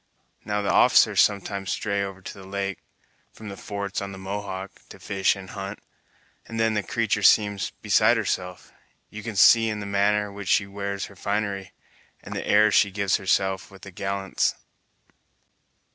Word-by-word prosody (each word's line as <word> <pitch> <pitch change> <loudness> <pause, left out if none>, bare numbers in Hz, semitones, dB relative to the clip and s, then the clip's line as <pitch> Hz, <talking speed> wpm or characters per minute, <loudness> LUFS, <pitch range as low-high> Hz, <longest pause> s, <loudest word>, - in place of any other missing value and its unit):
Now, 105 0 -2
the - - +1
officers - - +5
sometimes 100 -1 0
stray 100 -2 -1
over 95 -1 -7
to - - -7
the 95 -1 -12
lake, 100 0 -3 0.5
from 110 -2 -10
the 100 - -7
forts 100 0 -5
on 100 0 -5
the - - -9
Mohawk, 95 0 -5 0.2
to - - -12
fish 95 0 +1
and 95 -1 -10
hunt, 100 +1 -6 0.7
and 115 0 -5
then 110 0 +2
the 105 - 0
creatur' 105 +1 -1
seems 105 -1 +4
beside - - +4
herself! 90 -1 -3 0.4
You 110 - -7
can 110 0 -6
see 115 +4 +6
in 105 -1 -3
the 100 - -5
manner 100 +1 +1
which 100 -1 -7
she 100 - +3
wears 100 0 -4
her 100 - -14
finery, 100 0 -3 0.5
and - - -7
the - - -4
airs 105 0 +5
she 100 - +5
gives 100 -1 0
herself 95 0 0
with 95 0 -16
the 100 - -9
gallants." 95 +1 -1
100 Hz, 175 wpm, -25 LUFS, 95-105 Hz, 0.7 s, see